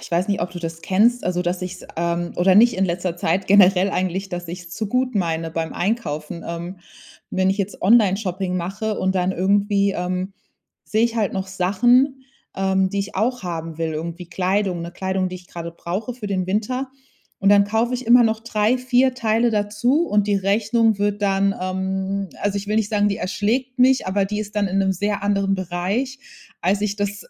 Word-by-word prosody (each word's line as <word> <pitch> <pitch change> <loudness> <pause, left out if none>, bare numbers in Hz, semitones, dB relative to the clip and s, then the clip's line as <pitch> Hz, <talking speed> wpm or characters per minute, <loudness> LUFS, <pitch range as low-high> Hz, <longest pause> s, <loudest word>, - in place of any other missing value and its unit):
ich 130 - -11
weiß 175 +3 0
nicht, 200 - 0
ob 175 - -3
du 175 - -7
das 165 -1 -6
kennst. 230 +6 +2
Also, 180 0 0
dass 175 +1 -2
ich's, 185 0 -7
ähm 170 +1 -1
oder 185 +1 +4
nicht 235 +4 +6
in 190 +1 +1
letzter 175 0 -2
Zeit 175 +3 0
generell 195 -1 +5
eigentlich 185 +1 -2
dass 175 -2 -6
ich's 175 0 -8
zu 205 +5 -3
gut 255 +2 0
meine 165 -4 -1
beim 160 0 -3
Einkaufen. 170 -6 -3
Ähm, 170 +2 -6 0.5
wenn 190 0 +2
ich 195 - -2
jetzt 200 0 -3
Onlineshopping 195 -3 +2
mache 195 +5 -3
und 190 0 0
dann 185 0 +1
irgendwie, 200 +1 +2
ähm, 185 +1 -3 0.5
sehe 220 +2 +1
ich 235 0 -1
halt 210 -3 0
noch 190 0 -3
Sachen, 240 +9 +2 0.3
ähm, 190 0 +1
die 200 - -2
ich 200 +1 -4
auch 245 +4 0
haben 165 -2 -5
will, 165 -1 -1
irgendwie 170 +3 -6
Kleidung, 185 0 0
'ne 170 - -6
Kleidung, 190 0 -1
die 185 - -6
ich 180 - -15
gerade 170 -1 -7
brauche 195 +8 -4
für 230 -4 -7
den 190 -2 -1
Winter. 250 +7 -2 0.5
Und 195 - +2
dann 200 0 +6
kaufe 225 +4 0
ich 250 -1 -5
immer 240 +1 +7
noch 220 -1 +1
3, 225 +2 +1
4 255 0 +2
Teile 230 -1 +1
dazu 220 +9 +1
und 205 -1 +2
die 205 - +3
Rechnung 215 +2 +2
wird 205 0 -1
dann, 195 0 +2
ähm 190 +1 -2
Also 200 0 0
ich 200 - -7
will 210 - 0
nicht 220 -2 0
sagen, 205 -1 +2
die 200 - -1
erschlägt 235 +8 -1
mich, 260 +1 +4
aber 195 +1 +1
die 210 +1 -3
ist 210 0 -7
dann 205 -1 +1
in 190 - -2
'nem 190 -1 +2
sehr 205 +2 -2
anderen 200 -1 +1
Bereich, 190 +9 -2 0.4
als 195 +3 +1
ich 205 -1 -1
das 205 -1 -3
195 Hz, 205 wpm, -21 LUFS, 180-215 Hz, 0.5 s, immer